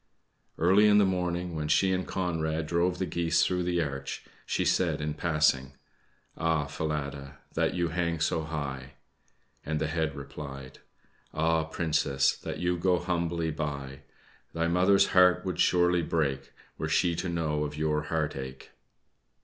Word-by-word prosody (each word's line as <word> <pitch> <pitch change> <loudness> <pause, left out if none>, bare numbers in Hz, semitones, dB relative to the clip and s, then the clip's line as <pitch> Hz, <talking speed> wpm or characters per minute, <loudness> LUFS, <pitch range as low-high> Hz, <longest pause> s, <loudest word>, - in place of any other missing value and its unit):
Early 95 +6 +5
in 105 0 +6
the 105 - +5
morning, 90 -2 -1
when 75 -1 -2
she 95 +5 +3
and 95 0 -2
Conrad 80 -3 -1
drove 85 +3 +1
the 95 - -1
geese 85 -2 +1
through 90 -1 0
the 85 -1 +1
arch, 70 -2 -5 0.2
she - - 0
said - - +1
in 75 0 -2
passing: 75 -4 +1 0.6
"Ah, 80 -2 0
Falada, 70 -2 -4 0.2
that - - 0
you 85 -2 0
hang 85 -1 -1
so 80 0 +1
high!" 70 -4 -5 0.7
and 75 0 -2
the 80 - 0
head 80 -2 -1
replied: 70 -1 -8 0.6
"Ah 80 0 +2
Princess, 75 -4 +1
that - - -6
you 90 0 -1
go 90 +1 +3
humbly 85 -2 -1
by! 70 -3 -4 0.5
Thy 85 0 0
mother's 90 +3 +4
heart 90 0 +5
would 90 - -3
surely 90 -1 +3
break 70 -5 -1 0.3
Were - - -2
she 85 - +2
to 90 - -2
know 80 -3 -1
of 75 0 -5
your 75 0 0
heart 75 -1 -1
ache!" 65 -1 -8
80 Hz, 155 wpm, -28 LUFS, 75-90 Hz, 0.7 s, in